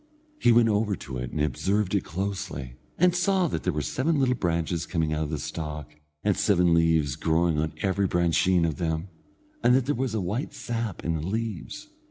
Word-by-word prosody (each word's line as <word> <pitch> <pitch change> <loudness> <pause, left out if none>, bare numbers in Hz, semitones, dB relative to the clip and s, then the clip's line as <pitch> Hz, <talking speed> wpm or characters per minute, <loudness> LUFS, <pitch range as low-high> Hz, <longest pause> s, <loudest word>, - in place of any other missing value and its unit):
He - - +5
went 115 0 +5
over 105 -1 +1
to 65 -7 -7
it, 60 0 -4
and - - -4
observed 95 +7 0
it 100 - +2
closely, 95 -7 -4 0.2
and 180 +1 +4
saw 185 0 +2
that - - -2
there 90 - 0
were 75 -2 -2
seven 150 - 0
little 130 -2 +3
branches 85 -5 -1
coming 80 -3 0
out 75 0 -1
of - - -6
the 75 - -2
stalk, 75 0 -5 0.3
and 105 -2 +2
seven 90 -4 +3
leaves 80 -4 +3
growing 80 0 +1
on 80 0 -1
every 100 0 +1
brancheen 85 0 +2
of 80 -3 -2
them; 80 +1 -2 0.5
and 125 - +5
that 130 -1 +2
there 145 - +1
was 125 -3 -2
a - - +1
white 105 - -3
sap 115 -5 -4
in 80 - +1
the 80 - -2
leaves. 110 - -4
90 Hz, 205 wpm, -26 LUFS, 80-110 Hz, 0.5 s, He